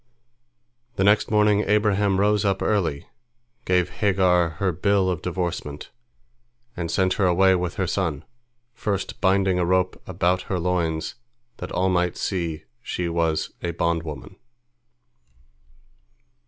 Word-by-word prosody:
The - - +1
next 105 +2 +3
morning 105 -1 +3
Abraham 105 -2 +2
rose 105 +1 +2
up 100 -1 0
early, 85 -9 0 0.6
gave 90 -1 +1
Hagar 90 -4 +3
her 95 +1 +1
bill 95 +2 +1
of 85 -3 -3
divorcement, 85 -5 -4 0.8
and 85 -1 -4
sent 95 +2 +1
her 95 - +4
away 95 +2 +4
with 90 -1 -1
her 95 - -1
son, 85 -7 -2 0.5
first 100 -4 -3
binding 95 -1 +2
a 90 - +1
rope 95 0 +1
about 90 0 +1
her 95 - 0
loins 85 -2 -1 0.4
that - - -7
all 95 +1 +1
might 90 -1 0
see 85 -5 -3 0.2
she 90 -7 -3
was 85 -2 0
a 85 -1 -3
bondwoman. 85 +1 -3
90 Hz, 125 wpm, -24 LUFS, 85-95 Hz, 0.8 s, her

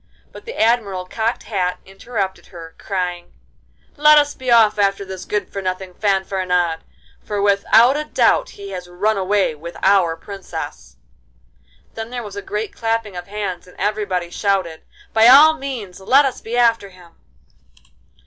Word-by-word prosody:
But - - -13
the 475 - -7
Admiral 215 -5 +1
Cocked 225 +5 -2
Hat 180 -4 -2
interrupted 195 0 -5
her, 165 -2 -11
crying: 180 -3 -4 0.6
'Let 300 +1 +7
us 290 0 +3
be 260 -1 -6
off 220 -3 +5
after 200 0 +1
this 190 -1 -8
good 205 -2 -3
for 195 - -4
nothing 185 0 -4
Fanfaronade, 185 -4 0 0.4
for 205 -1 -4
with 200 0 +2
out 240 +4 +6
a 300 - -1
doubt - - +2
he 200 -1 -8
has 180 -2 -7
run 200 +5 0
away 195 -2 +1
with 165 +3 -10
our 185 -4 +3
Princess.' 190 - -8 1.0
Then 225 0 -6
there 245 -1 -5
was 205 -2 -9
a 200 - -5
great 210 +1 -4
clapping 225 -3 -2
of 175 0 -7
hands, 200 -4 -5
and 180 - -18
everybody 195 -5 -2
shouted, 185 -5 -1 0.3
'By 225 +1 +6
all 290 +5 +8
means 255 -11 -7
let 265 +9 +4
us 265 - -3
be 235 +2 -4
after 230 -4 +2
him. 180 -2 -18
200 Hz, 160 wpm, -19 LUFS, 185-225 Hz, 1.0 s, all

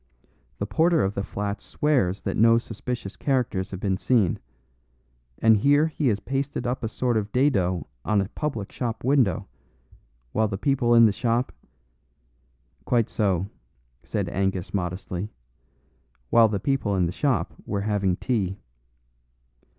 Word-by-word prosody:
The 100 - -2
porter 160 - +3
of 95 +1 0
the 100 - -2
flats 100 +1 -4
swears 120 -11 0
that - - -2
no 115 +1 +5
suspicious 115 -2 -5
characters 120 -8 -1
have 95 - -6
been 95 -1 0
seen, 105 -5 +2 1.0
and 110 -1 +5
here 145 +7 +4
he 155 -2 -1
has 105 -4 +2
pasted 135 +3 -3
up 125 +1 -2
a - - 0
sort 120 +1 0
of 105 -1 -2
dado 95 - +1 0.2
on 105 -1 +2
a 95 - 0
public 115 -10 -4
shop 120 -2 -4
window, 125 - +2 0.8
while 110 0 +2
the 100 -2 -3
people 120 +1 +2
in 115 0 +8
the 110 - +5
shop 120 +4 0 0.7
" - - -40
"Quite 120 -3 +1
so," 95 -4 +1 0.6
said - - -3
Angus 95 0 -2
modestly, 90 +1 -3 1.0
"while 115 -1 +7
the 105 -2 -2
people 135 -7 0
in 90 -2 +2
the 85 - -1
shop 115 - 0
were 100 - -1
having 100 -3 +1
tea. 100 -4 -1
105 Hz, 150 wpm, -25 LUFS, 95-125 Hz, 1.0 s, in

